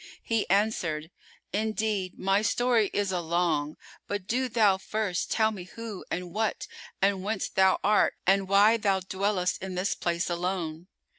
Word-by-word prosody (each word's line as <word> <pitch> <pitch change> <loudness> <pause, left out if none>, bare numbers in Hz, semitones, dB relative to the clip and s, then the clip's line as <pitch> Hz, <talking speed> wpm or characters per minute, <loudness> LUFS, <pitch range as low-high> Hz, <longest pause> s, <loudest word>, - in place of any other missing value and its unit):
He 225 -2 -1
answered, 175 -6 0 0.4
"Indeed 215 -3 -1
my 195 +2 +2
story 230 -1 +2
is 200 -2 0
a 180 -2 -1
long 160 -3 0 0.3
but 205 -2 -3
do 255 +5 0
thou 210 -5 +3
first 205 -3 -2
tell 220 -1 +2
me 190 -5 -7
who 220 +1 -8
and 180 -1 -4
what 220 +1 -1 0.4
and 195 -1 +2
whence 210 0 -1
thou 190 0 +3
art 210 +1 +3
and 195 +1 +3
why 205 +4 +5
thou 200 -3 +1
dwellest 190 0 -1
in 190 -1 -5
this 185 +2 0
place 170 0 -1
alone." 175 -2 -3
195 Hz, 155 wpm, -28 LUFS, 180-215 Hz, 0.4 s, why